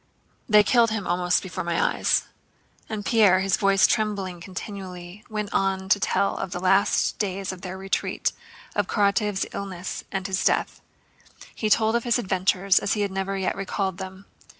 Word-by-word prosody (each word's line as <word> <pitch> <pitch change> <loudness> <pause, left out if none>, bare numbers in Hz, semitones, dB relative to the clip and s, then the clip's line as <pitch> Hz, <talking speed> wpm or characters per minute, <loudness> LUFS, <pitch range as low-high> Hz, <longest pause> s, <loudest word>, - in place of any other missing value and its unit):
"They 210 -1 +7
killed 235 +2 +4
him 220 -3 -3
almost 180 0 +1
before 185 -3 -5
my 170 0 -1
eyes." - - +2 0.7
And 215 -2 -4
Pierre, 205 -5 +4
his 195 0 +2
voice 195 -1 +4
trembling 195 -5 -1
continually, 185 0 -8
went 210 -1 -4
on 190 -1 0
to 200 - +4
tell 195 0 +1
of - - -3
the 175 0 -4
last 195 +2 +2
days 195 -1 -2
of 185 -1 -9
their 185 -1 -6
retreat, 195 0 -1 0.4
of - - 0
Karatáev's 205 -1 +1
illness 190 -2 -5
and 195 -1 -3
his 190 -1 -1
death. - - 0 0.7
He 215 - -2
told 220 +1 +3
of 235 - +1
his 240 0 +2
adventures 190 -2 +2
as - - 0
he 210 - -1
had 200 -1 -1
never 195 +1 -2
yet 190 - -1
recalled 195 -1 -3
them. 190 +1 -8
195 Hz, 175 wpm, -25 LUFS, 185-205 Hz, 0.7 s, They